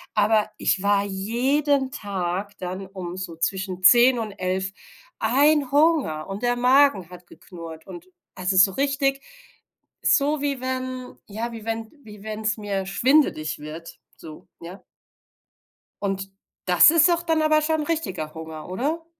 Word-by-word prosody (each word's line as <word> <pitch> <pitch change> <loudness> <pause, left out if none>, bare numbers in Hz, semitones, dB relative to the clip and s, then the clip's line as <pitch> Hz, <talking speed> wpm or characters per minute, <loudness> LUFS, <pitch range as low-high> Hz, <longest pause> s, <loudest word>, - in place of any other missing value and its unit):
Aber 215 0 +2
ich 190 - 0
war 200 0 +2
jeden 260 +8 0
Tag 200 -4 -4
dann 185 +1 -6
um 185 -2 -7
so 185 -3 -6
zwischen 185 +2 -3
10 240 +4 +6
und 220 -2 -4
11 190 0 -3 0.5
ein 280 +4 +2
Hunger 290 - +2
und 195 +2 -6
der 245 0 +1
Magen 250 - +3
hat 180 -1 -13
geknurrt. 165 -2 -11
Und 345 +1 -11 0.3
also 185 +1 -1
so 195 +1 +6
richtig, 275 +2 0 0.8
so 290 +1 +2
wie 280 -2 -2
wenn, 255 -1 -5
ja 225 +3 -5
wie 225 -2 -9
wenn 225 -1 -4
wie 210 -3 -13
wenn's 215 0 -3
mir 200 -2 -3
schwindelig 200 - +1
wird, 155 +3 -10 0.2
so, 155 -1 -12
ja. 175 +4 -10 1.2
Und 195 -1 -3 0.3
das 180 - +7
ist 330 +1 +5
auch 340 0 +1
dann 325 -2 0
aber 310 0 +3
schon 315 0 0
richtiger 195 - -3
Hunger, 160 -1 -9
oder? 295 - -3
215 Hz, 145 wpm, -23 LUFS, 185-275 Hz, 1.2 s, das